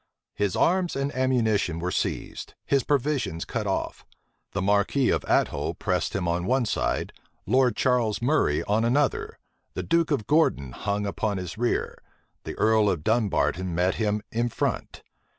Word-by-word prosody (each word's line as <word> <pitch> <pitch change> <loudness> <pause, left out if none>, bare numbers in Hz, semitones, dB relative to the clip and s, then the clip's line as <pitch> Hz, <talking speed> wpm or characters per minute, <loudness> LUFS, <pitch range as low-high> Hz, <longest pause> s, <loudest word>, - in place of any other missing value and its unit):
His 100 -2 -1
arms 180 0 +2
and 140 +1 -2
ammunition 115 -9 +1
were 90 +2 -2
seized, - - -3
his 140 -2 +2
provisions 135 - -1
cut 110 -3 -3
off: 95 - -2 0.5
the 100 - -3
marquis 100 +7 +2
of - - 0
Athole - - +1
pressed - - -1
him 95 -3 -1
on 85 +2 -1
one 130 -1 +2
side; - - -1 0.3
Lord 125 +1 +3
Charles 120 -4 +1
Murray 125 - +1
on 105 +2 +1
another; 135 +4 0 0.4
the - - -3
duke 170 -1 +2
of 135 -9 0
Gordon 145 - +2
hung 100 +8 -2
upon 100 0 -2
his 90 -1 -5
rear; 120 +2 -1 0.5
the - - -5
earl 110 -1 +3
of 85 -6 -2
Dunbarton 95 -5 0
met 90 +2 +2
him 105 -1 0
in 120 +1 0
front. - - -3
110 Hz, 155 wpm, -26 LUFS, 95-130 Hz, 0.5 s, Lord